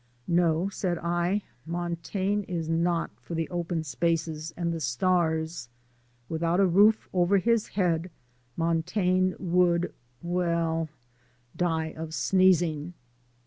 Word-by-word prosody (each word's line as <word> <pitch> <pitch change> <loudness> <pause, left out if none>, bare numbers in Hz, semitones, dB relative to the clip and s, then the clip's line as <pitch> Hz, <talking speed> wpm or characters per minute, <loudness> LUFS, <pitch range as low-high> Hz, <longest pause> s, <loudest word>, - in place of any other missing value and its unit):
"No," 170 0 +2
said 185 -3 -2
I, 175 +4 0 0.2
"Montaigne 175 +4 -2
is 170 -3 -3
not 165 +1 0
for 170 - -7
the 165 0 -1
open 170 -2 -2
spaces 160 0 -1
and 170 -1 -1
the 165 - -3
stars. 160 0 0 0.6
Without 165 +2 0
a 200 - +5
roof 205 +5 +4
over 180 +2 +3
his 230 +3 +2
head 175 -3 0 0.5
Montaigne 180 +3 +1
would 175 -1 +2 0.3
well, 170 -2 0 0.7
die 160 -2 -1
of 160 0 -6
sneezing." 175 -1 +2
170 Hz, 110 wpm, -27 LUFS, 165-180 Hz, 0.7 s, a